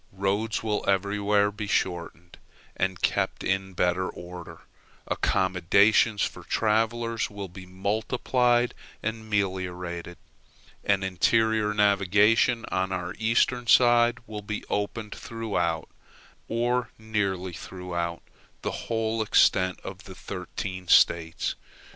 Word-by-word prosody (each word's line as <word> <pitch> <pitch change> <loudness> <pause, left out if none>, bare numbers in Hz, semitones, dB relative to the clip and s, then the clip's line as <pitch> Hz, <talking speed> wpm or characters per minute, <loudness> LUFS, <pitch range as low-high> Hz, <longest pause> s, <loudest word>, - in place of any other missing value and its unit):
Roads 100 +3 -1
will 105 -2 -1
everywhere 100 +1 +2
be 105 0 -6
shortened, 90 -2 -2 0.4
and 95 -1 -2
kept - - 0
in 95 0 -1
better 90 +1 +1
order; 90 0 -9 0.5
accommodations 100 +4 +3
for - - -3
travelers 115 +1 0
will 100 -2 -6
be 90 +1 -11
multiplied 120 +5 +1 0.3
and 110 0 -4
meliorated; 90 -3 -2 0.7
an 100 -1 +2
interior 110 +3 +2
navigation 105 +3 +3
on 95 +1 0
our 90 -2 -3
eastern 120 +2 +1
side 120 0 +5
will 105 -2 -6
be 105 +1 -5
opened 105 +1 -2
throughout, 105 -8 -2 0.6
or 120 +2 0
nearly 100 -5 -2
throughout, 85 -1 -5 0.4
the - - -1 0.2
whole 110 0 0
extent 95 -3 +3
of - - -8
the - - -10
thirteen 95 -2 -6
States. 85 -1 +3
100 Hz, 105 wpm, -26 LUFS, 95-110 Hz, 0.7 s, side